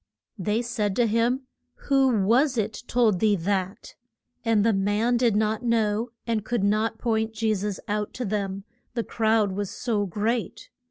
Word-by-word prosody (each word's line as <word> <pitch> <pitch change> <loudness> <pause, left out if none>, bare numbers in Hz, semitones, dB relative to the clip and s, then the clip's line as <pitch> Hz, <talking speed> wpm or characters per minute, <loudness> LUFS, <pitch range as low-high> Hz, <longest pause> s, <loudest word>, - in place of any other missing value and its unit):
They 210 +5 0
said 210 -4 -1
to 240 - +3
him, 230 +4 +1 0.5
Who 270 -1 +4 0.2
was 250 +6 +3
it 220 0 -2
told 225 -6 +2
thee 210 0 +3
that? 190 +2 -2 0.5
And 225 -3 +2
the 225 - +4
man 205 +5 +1
did 235 -3 +2
not 215 +1 +1
know, 230 -1 +1 0.2
and 225 -3 -1
could 235 -2 -1
not 215 +2 +1
point 220 -2 -1
Je 220 0 +1
sus 205 0 -3
out 210 0 -2
to 250 - -3
them, 195 -1 -2 0.3
the 235 - 0
crowd 220 -3 +1
was 200 0 -3
so 215 -5 -1
great. 220 +6 -2
220 Hz, 165 wpm, -25 LUFS, 205-235 Hz, 0.5 s, Who